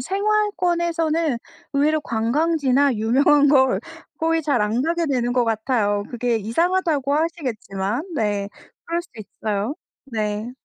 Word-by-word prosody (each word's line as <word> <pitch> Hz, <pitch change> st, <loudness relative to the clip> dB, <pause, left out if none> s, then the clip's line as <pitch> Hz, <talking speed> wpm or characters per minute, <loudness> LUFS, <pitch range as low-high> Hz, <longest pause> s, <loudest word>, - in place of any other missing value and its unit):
생활권에서는 345 Hz, -, 0 dB, 0.3 s
의외로 300 Hz, +2 st, +2 dB
관광지나 280 Hz, +2 st, +1 dB
유명한 275 Hz, +6 st, +4 dB
걸 265 Hz, -2 st, +4 dB, 0.4 s
거의 325 Hz, 0 st, +1 dB
잘 280 Hz, -6 st, +1 dB
안 220 Hz, +4 st, 0 dB
가게 335 Hz, +2 st, 0 dB
되는 245 Hz, -3 st, 0 dB
것 245 Hz, -1 st, +2 dB
같아요. 220 Hz, -3 st, 0 dB
그게 240 Hz, -1 st, 0 dB
이상하다고 295 Hz, -, 0 dB
하시겠지만 250 Hz, -, -2 dB
네 205 Hz, -5 st, -1 dB, 0.4 s
그럴 335 Hz, +1 st, -1 dB
수도 250 Hz, -10 st, -13 dB
있어요. 215 Hz, +4 st, -3 dB, 0.3 s
네. 215 Hz, -1 st, -3 dB
275 Hz, 280 characters per minute, -22 LUFS, 225-325 Hz, 0.4 s, 유명한